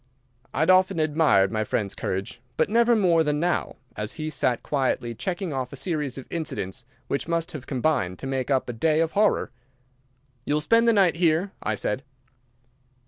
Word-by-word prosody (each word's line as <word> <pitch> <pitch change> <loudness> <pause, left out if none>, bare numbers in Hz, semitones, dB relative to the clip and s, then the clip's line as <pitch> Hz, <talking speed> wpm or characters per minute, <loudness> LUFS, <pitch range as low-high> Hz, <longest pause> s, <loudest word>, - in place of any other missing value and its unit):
I 140 - -2
had 160 - +5
often 185 -1 +4
admired 150 -11 +3
my 110 -1 0
friend's 105 -1 -2
courage, 95 +6 -4 0.2
but - - +1
never 235 +1 +4
more 175 -6 +3
than 150 -1 0
now, 175 +1 -1 0.2
as 105 0 -3
he 155 -1 -4
sat 130 -4 0
quietly 130 -4 -1
checking 175 - -3
off 130 -2 -3
a - - -7
series 150 -7 -2
of 135 - -7
incidents 130 - -4 0.2
which 140 - -2
must 170 +1 -1
have 140 -5 -8
combined 130 - 0
to - - -8
make 135 -1 -2
up 135 -2 +1
a 120 - -4
day 155 +7 +1
of 165 0 +1
horror. 210 0 +2 0.9
"You 145 - 0
will 150 - +1
spend 230 +7 +3
the - - +6
night 190 -5 +3
here?" 170 +3 +2
I 110 - -1
said. 105 +4 -2
150 Hz, 190 wpm, -25 LUFS, 125-170 Hz, 0.9 s, the